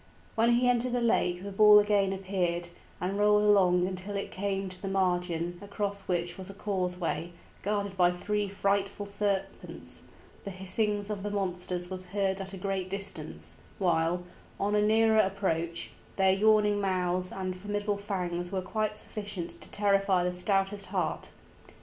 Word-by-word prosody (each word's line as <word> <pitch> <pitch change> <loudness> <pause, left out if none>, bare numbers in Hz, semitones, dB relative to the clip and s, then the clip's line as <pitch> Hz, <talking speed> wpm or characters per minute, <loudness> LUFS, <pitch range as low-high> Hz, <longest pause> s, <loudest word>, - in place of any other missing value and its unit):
When 230 +1 +3
he 245 +1 +3
entered 245 0 +2
the 245 - +2
lake 180 -6 +1
the 200 - -5
ball 210 +1 +8
again 205 -2 +3
appeared, 185 -3 -1 0.3
and 190 +3 -2
rolled 210 0 +5
along 185 -4 +4
until 190 +2 -4
it 200 - -3
came 195 0 -2
to 185 0 -8
the 195 - -4
margin, 175 -2 0
across 200 -1 -3
which 175 0 -1
was 190 0 -6
a 195 - -9
causeway, 180 -4 -2 0.3
guarded 200 -1 -1
by 175 -1 +5
three 205 +3 -1
frightful 200 +1 0
serpents; 200 -1 -3 0.4
the 200 - -5
hissings 205 +2 0
of 205 -2 -3
the 205 - -3
monsters 180 -2 -2
was 185 0 -5
heard 195 0 -1
at 190 0 -3
a 195 - -7
great 190 0 -2
distance, 195 +1 -4 0.2
while, 175 -1 +1 0.4
on 205 +1 0
a 210 - +4
nearer 220 +1 +4
approach, 170 - 0 0.2
their 190 -1 +4
yawning 210 0 +4
mouths 185 -1 0
and 185 -1 -3
formidable 205 +2 -2
fangs 175 -3 -3
were 190 -1 -2
quite 215 +2 -1
sufficient 205 -5 -5
to - - -7
terrify 195 -3 +2
the 180 0 0
stoutest 195 +2 0
heart. - - -2
195 Hz, 160 wpm, -29 LUFS, 180-205 Hz, 0.4 s, ball